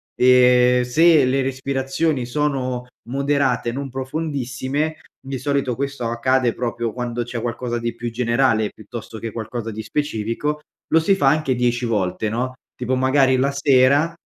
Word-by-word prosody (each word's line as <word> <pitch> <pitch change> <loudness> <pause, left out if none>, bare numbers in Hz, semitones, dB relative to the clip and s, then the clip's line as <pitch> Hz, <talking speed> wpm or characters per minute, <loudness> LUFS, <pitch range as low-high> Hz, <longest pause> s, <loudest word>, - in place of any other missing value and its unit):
e 125 0 +5
se 155 +3 +5
le 135 +2 +1
respirazioni 135 +2 -1
sono 130 -2 -2 0.2
moderate, 135 -3 0
non 135 +2 -5
profondissime, 135 +1 -3 0.2
di 135 0 -5
solito, 140 -3 -1
questo 140 -2 -3
accade 120 +1 +1
proprio 120 -1 -3
quando 120 0 -3
c'è 120 0 -5
qualcosa 120 0 -3
di 115 0 -3
più 120 0 -5
generale, 115 -2 +1
piuttosto 110 0 -9
che 115 +1 -5
qualcosa 115 +1 -5
di 110 +1 -6
specifico, 150 +2 -2 0.3
lo 160 - +5
si 195 +5 +3
fa 145 -8 +1
anche 145 -1 +2
10 120 0 0
volte, 105 -1 -1
no, 125 +4 -2 0.2
tipo, 125 +1 -1
magari, 130 0 +3
la 140 +2 +1
sera, 140 +3 +3
130 Hz, 145 wpm, -21 LUFS, 120-140 Hz, 0.3 s, e